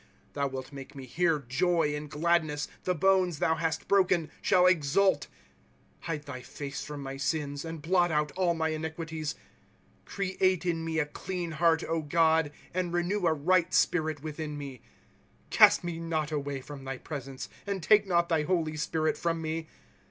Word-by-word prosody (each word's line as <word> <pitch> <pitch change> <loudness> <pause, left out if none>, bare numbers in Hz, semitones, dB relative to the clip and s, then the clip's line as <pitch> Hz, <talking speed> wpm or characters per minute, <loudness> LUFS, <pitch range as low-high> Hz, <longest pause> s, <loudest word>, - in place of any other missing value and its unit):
« - - -34
Thou 140 -1 0
wilt 130 0 -6
make 135 +1 -9
me 135 -1 -8
hear 165 +4 +1
joy 150 +4 +1
and 150 0 -6
gladness; 155 -2 +1 0.2
The 180 - +1
bonea 185 -1 +3
thou 160 - +2
hast 160 0 -2
broken 185 -5 +3
shall 180 -1 +4
exult. 170 -1 +3 0.4
» - - -35
Hide 150 -3 -3
thy 130 -3 -7
face 140 +2 -6
from 145 -1 -7
my 135 0 -5
slna, 145 0 -2
And 165 -2 -7
blot 175 +1 +3
out 150 -1 +1
all 180 -2 +1
my 160 -1 0
iniquities. 160 -1 -4 0.4
'" - - -34
Create 185 -2 0
in 165 -2 0
mo 160 -1 -1
a 155 - +2
clean 175 +3 -5
heart, 165 +1 +3 0.3
God, 160 -2 +3 0.2
And 180 -1 -1
renew 175 +2 0
a 160 - +4
right 180 +4 +2
spirit 155 -3 +1
witiiiu 155 -1 -5
me. 140 -4 -7 0.4
" - - -9
Oast - - +8
me 170 -1 -4
not 160 -2 -2
away 140 -2 -3
from 135 0 -9
thy 135 0 -4
presence, 135 -2 -6 0.2
And 195 -4 -2
take 210 +2 +5
not 170 -2 +2
thy 165 -3 +2
holy 160 -2 0
Spirit 155 +1 0
from 165 -1 0
me. 160 0 -3
160 Hz, 180 wpm, -29 LUFS, 145-175 Hz, 0.4 s, Oast